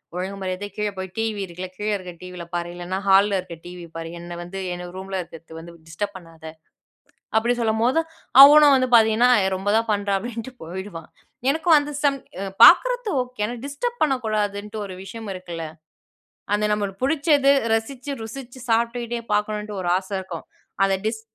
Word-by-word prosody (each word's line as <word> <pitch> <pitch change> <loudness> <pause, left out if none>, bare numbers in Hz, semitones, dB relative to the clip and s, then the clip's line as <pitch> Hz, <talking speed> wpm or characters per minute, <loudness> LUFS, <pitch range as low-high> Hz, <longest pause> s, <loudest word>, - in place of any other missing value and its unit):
"ஒழுங்கு 190 +2 -4
மரியாதையா 185 +2 -4
கீழ 210 0 0
போய் 190 -1 -5
டிவியிருக்குல, 195 -5 -3
கீழ 210 +1 -2
இருக்க 180 -2 -9
டிவில 180 -1 -8
பாரு! 175 0 -2
இல்லன்னா, 175 +2 -4
ஹால்ல 195 0 +5
இருக்க 170 -2 -8
டிவி 175 -1 -9
பாரு. 165 0 -5
என்ன 175 0 -8
வந்து 195 +2 -7
என் 180 0 -7
ரூம்ல 190 0 -4
இருக்கிறது 165 -1 -11
வந்து 170 +1 -11 0.2
டிஸ்டர்ப் 195 +5 -4
பண்ணாத!" 165 -2 -15 0.9
அப்பிடி 235 +2 +2
சொல்லும்போது, 230 +6 +2 0.4
அவனும் 295 0 +8
வந்து 255 -1 +1
பாத்தீங்கன்னா, 225 +2 +5 0.2
ஏ - - +2
ரொம்ப 195 +2 -3
தான் 225 0 -1
பண்றா! 200 0 -1
அப்பிடின்ட்டுப் 240 +3 -7
போயிடுவான் 175 -2 -7 0.4
எனக்கும் 320 +3 +4
அந்த 290 0 -5
சம் 280 -1 +3 0.3
அ 200 - -3 0.2
பாக்குறது - - +5
ஓகே, 250 -3 -10
ஆனா, 240 - -5
டிஸ்டர்ப் 475 +13 -4
பண்ணக் 270 -5 0
கூடாதுன்டு 210 0 -2
ஒரு 190 - -8
விஷயம் 220 +3 -8
இருக்குல! 175 -3 -7 0.9
அந்த 210 +1 +2
நம்மளுக்கு 200 0 -2
புடிச்சது 285 -1 +3 0.2
ரசிச்சு 250 +5 -3
ருசிச்சு 255 +2 -9
சாப்ட்டுக்கிட்டே 235 +1 0
பாக்கணுன்டு 210 0 -1
ஒரு 175 - -4
ஆசை 190 +1 -8
இருக்கும். 185 -3 -7 0.4
அத 195 0 +2
டிஸ் 220 0 -2
210 Hz, 165 wpm, -23 LUFS, 185-240 Hz, 0.9 s, அவனும்